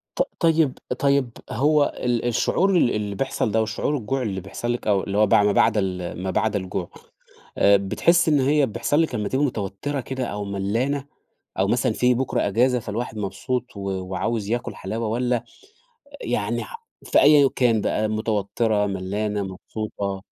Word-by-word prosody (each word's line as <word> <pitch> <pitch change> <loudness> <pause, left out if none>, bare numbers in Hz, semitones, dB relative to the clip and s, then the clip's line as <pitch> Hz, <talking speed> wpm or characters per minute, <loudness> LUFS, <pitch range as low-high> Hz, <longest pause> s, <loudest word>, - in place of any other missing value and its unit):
ط - - 0 0.2
طيب 160 -4 +2 0.2
طيب 140 -2 +2 0.2
هو 145 +4 +2
ال 120 -1 -1
الشعور 120 - +2
ال 125 - +3
اللي 105 -1 -3
بيحصل 130 -2 -1
ده 110 +1 +2
وشعور 115 +7 -1
الجوع 130 +3 -2
اللي 95 -5 -3
بيحصل 120 +6 -3
لِك 120 - -5
أو 100 -2 +2
اللي 100 +1 -3
هو 110 - +5
بع 100 - +5
ما 105 - +3
بعد 100 - +3
ال 90 -2 -3
ما 95 - -1
بعد 110 +3 0
الجوع، 95 -2 -3 0.7
آآ، 100 0 +6
بتحسي 160 - +2
إن 145 - +4
هي 145 +2 +3
بيحصل 115 +6 0
لِك 160 -6 -1
لمّا 105 -2 -1
تبقى 135 +3 +1
متوترة 115 +4 -3
كده 130 +1 -4
أو 105 -2 -4
ملّانة 115 +8 -1 0.5
أو - - +3
مثلًا - - +1
في 125 0 +3
بُكرة 125 -3 0
إجازة، 125 +5 +2
فالواحد 110 0 -5
مبسوط 120 +5 -3
و 100 - -6 0.2
وعاوز 100 +3 -2
ياكل 120 +1 -2
حلاوة 110 +4 -4
والّا 120 +1 0 0.8
يعني - - -2
ح 460 -1 -11 0.2
في - - +4
أيًا 145 -2 +7
كان 115 -4 +3
بقى 110 +1 0
متوترة، 110 0 0
ملّانة، 100 +2 -2
مبسوطة؟ 100 0 -5
110 Hz, 170 wpm, -23 LUFS, 100-130 Hz, 0.8 s, أيًا